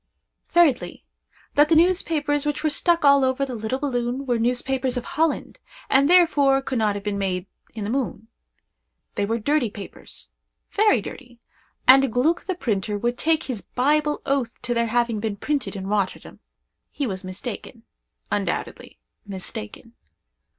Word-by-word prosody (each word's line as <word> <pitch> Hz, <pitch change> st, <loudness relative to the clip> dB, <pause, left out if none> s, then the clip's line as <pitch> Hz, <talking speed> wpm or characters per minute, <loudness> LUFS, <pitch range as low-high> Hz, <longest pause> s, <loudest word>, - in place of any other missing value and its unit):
Thirdly. 330 Hz, -8 st, +2 dB, 0.5 s
That 295 Hz, +1 st, +4 dB
the 330 Hz, -, +5 dB
newspapers 315 Hz, -4 st, +2 dB
which 295 Hz, 0 st, -2 dB
were 310 Hz, -, +2 dB
stuck 335 Hz, +1 st, +2 dB
all 280 Hz, -1 st, +6 dB
over 260 Hz, +1 st, +1 dB
the 260 Hz, -, -6 dB
little 220 Hz, +2 st, -2 dB
balloon 255 Hz, -1 st, -2 dB
were 240 Hz, -3 st, 0 dB
newspapers 250 Hz, +2 st, 0 dB
of 245 Hz, -, -2 dB
Holland, 320 Hz, 0 st, -1 dB, 0.3 s
and 275 Hz, +2 st, +4 dB
therefore 300 Hz, -7 st, +5 dB
could 260 Hz, -3 st, -2 dB
not 210 Hz, -2 st, +1 dB
have 200 Hz, -, -5 dB
been 205 Hz, -1 st, -2 dB
made 185 Hz, -2 st, -2 dB, 0.3 s
in 215 Hz, -, -4 dB
the 205 Hz, -, -3 dB
moon. 240 Hz, -4 st, -3 dB, 0.9 s
They 200 Hz, -, -1 dB
were 225 Hz, +2 st, 0 dB
dirty 275 Hz, +1 st, +1 dB
papers—very 400 Hz, -, -3 dB
dirty—and 255 Hz, +1 st, +1 dB
Gluck, 300 Hz, +9 st, +1 dB
the 375 Hz, -, -2 dB
printer, 210 Hz, -, -2 dB
would 240 Hz, +4 st, -1 dB
take 320 Hz, 0 st, +2 dB
his 245 Hz, -6 st, -4 dB
Bible 295 Hz, +3 st, 0 dB
oath 270 Hz, -4 st, -1 dB
to 245 Hz, -, -1 dB
their 235 Hz, 0 st, +1 dB
having 235 Hz, -1 st, 0 dB
been 215 Hz, -1 st, -2 dB
printed 285 Hz, +2 st, -2 dB
in 190 Hz, -1 st, -5 dB
Rotterdam. 200 Hz, -1 st, -2 dB, 0.5 s
He 285 Hz, -, -3 dB
was 190 Hz, -4 st, -4 dB
mistaken—undoubtedly—mistaken. 200 Hz, -, -7 dB
255 Hz, 145 wpm, -23 LUFS, 220-290 Hz, 0.9 s, all